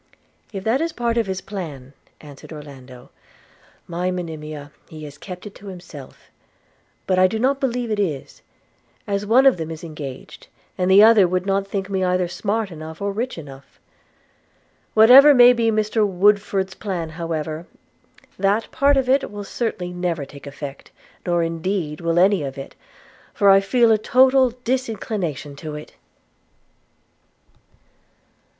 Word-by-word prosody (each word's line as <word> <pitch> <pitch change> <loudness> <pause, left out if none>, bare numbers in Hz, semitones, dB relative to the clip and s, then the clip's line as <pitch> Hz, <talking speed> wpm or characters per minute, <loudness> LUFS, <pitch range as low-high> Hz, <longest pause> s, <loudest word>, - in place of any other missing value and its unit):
'If 195 -3 -6
that 230 +7 +1
is 330 0 -2
part 235 -1 -1
of 225 - -1
his 190 -1 -3
plan,' 150 -11 -8 0.3
answered 145 0 -13
Orlando, 135 -5 -12 0.8
'my 175 +2 -2
Monimia, 155 -5 -6 0.2
he 155 -1 -10
has 145 -1 -10
kept 180 0 -9
it 205 - -9
to 205 - -14
himself. 175 -7 -12 0.3
– - - -40
But 185 -1 +1
I 185 - +6
do 220 - -3
not 265 +4 +1
believe 245 -3 -2
it 210 - -1
is, 155 -9 -3 0.6
as 200 0 -2
one 250 +5 +5
of 270 -8 +5
them 160 -1 -5
is 160 +1 -8
engaged, 150 -5 -9 0.3
and 180 0 0
the 195 +2 +8
other 220 -4 +6
would 180 +1 -1
not 195 0 0
think 195 -1 -3
me 190 -1 -1
either 180 0 +1
smart 205 +3 -2
enough 160 0 -9
or 200 0 -2
rich 235 +4 -4
enough. 140 -3 -12 1.2
Whatever 260 +7 +8
may 245 0 +8
be 230 -2 +1
Mr 215 0 +1
Woodford's 195 0 +1
plan, 180 -6 -4
however, 160 0 -5 0.7
that 200 +3 0
part 280 0 +3
of 265 -1 +1
it 270 +2 +2
will 205 0 -7
certainly 190 -5 -4
never 175 -4 -2
take 140 +1 -13
effect; 140 -1 -8 0.4
nor 175 -1 +2
indeed 165 -1 -3
will 170 0 0
any 190 +1 +4
of 135 -1 -5
it, 135 - -8 0.6
for 200 -3 +5
I 195 - +7
feel 225 +4 +3
a 215 - +3
total 260 +2 +4
disinclination 215 - -3
to 155 0 -7
it.' 150 - -10
190 Hz, 155 wpm, -21 LUFS, 160-220 Hz, 1.2 s, the